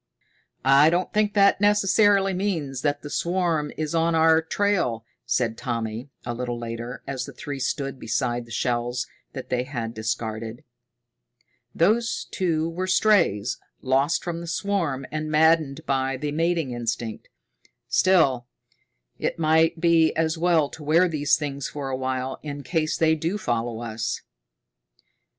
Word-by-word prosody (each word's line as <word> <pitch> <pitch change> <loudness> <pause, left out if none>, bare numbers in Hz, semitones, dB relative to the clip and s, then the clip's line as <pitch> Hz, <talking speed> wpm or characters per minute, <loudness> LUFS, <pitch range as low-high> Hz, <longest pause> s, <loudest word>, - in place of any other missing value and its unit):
"I 140 +3 +6
don't 175 +2 -1
think 210 0 +1
that 200 -1 +4
necessarily 205 -1 +4
means 165 -9 -2
that 145 0 -1
the 145 - -6
swarm 170 -4 0
is 155 0 -2
on 165 0 +2
our 160 0 +5
trail," 160 - 0 0.2
said 115 -3 0
Tommy, 115 +1 -3 0.2
a 120 - -2
little 120 0 -3
later, 120 +1 -6
as 130 -2 -3
the - - -9
three 145 -1 -6
stood 135 0 -2
beside 120 +1 -1
the - - -14
shells 120 +1 -1 0.3
that - - -7
they 125 -1 +1
had 120 -3 -4
discarded. 110 0 -4 1.1
"Those 220 +7 +2
two 165 -4 0
were 180 +3 -3
strays, 175 - +2 0.2
lost 135 +5 +2
from 170 -1 -4
the 170 - -7
swarm 165 -7 -1
and 155 0 -3
maddened 155 -2 +3
by 135 -1 0
the 145 +2 -3
mating 165 -2 0
instinct. 115 -2 -4 0.6
Still, 140 -10 +3 0.7
it - - -2
might 160 +1 +3
be 165 -1 +4
as 160 0 +1
well 165 -3 +2
to 160 - -10
wear 165 +5 +4
these 150 -4 +2
things 140 -3 -4
for 140 -2 -5
a 130 - -1
while, 130 0 -3
in 145 -1 -6
case 160 -1 -1
they 160 -1 +3
do 165 +5 -1
follow 120 - -2
us." 115 0 -3
150 Hz, 145 wpm, -24 LUFS, 125-170 Hz, 1.1 s, I